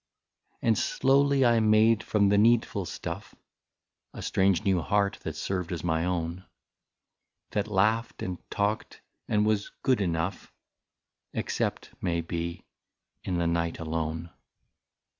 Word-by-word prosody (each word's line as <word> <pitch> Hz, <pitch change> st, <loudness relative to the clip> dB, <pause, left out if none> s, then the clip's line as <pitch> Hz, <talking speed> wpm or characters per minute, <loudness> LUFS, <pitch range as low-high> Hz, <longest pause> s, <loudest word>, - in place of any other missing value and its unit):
" -, -, -45 dB
And -, -, +4 dB
slowly 140 Hz, -, +3 dB
I 120 Hz, -1 st, +5 dB
made 110 Hz, 0 st, +4 dB
from 100 Hz, -3 st, +2 dB
the 100 Hz, -, +4 dB
needful 110 Hz, -3 st, +3 dB
stuff -, -, -6 dB, 0.8 s
A -, -, -6 dB
strange 95 Hz, 0 st, +2 dB
new 95 Hz, -4 st, +2 dB
heart 100 Hz, +3 st, +1 dB
that 80 Hz, -, -5 dB
served 90 Hz, +2 st, -3 dB
as 85 Hz, -2 st, -4 dB
my 80 Hz, -1 st, +1 dB
own, 90 Hz, 0 st, -2 dB, 1.1 s
That 105 Hz, 0 st, -1 dB
laughed 110 Hz, +3 st, +1 dB
and 90 Hz, -2 st, -4 dB
talked 105 Hz, +1 st, -2 dB, 0.3 s
and 105 Hz, 0 st, +2 dB
was 105 Hz, -1 st, +1 dB
good 130 Hz, -5 st, +3 dB
enough, 85 Hz, 0 st, -2 dB, 0.8 s
Except, -, -, -2 dB
may 85 Hz, -2 st, 0 dB
be, 85 Hz, +1 st, -4 dB, 0.6 s
in 90 Hz, -2 st, -1 dB
the 85 Hz, -, +1 dB
night 85 Hz, 0 st, 0 dB
alone. 80 Hz, +1 st, -3 dB
95 Hz, 130 wpm, -28 LUFS, 85-110 Hz, 1.1 s, I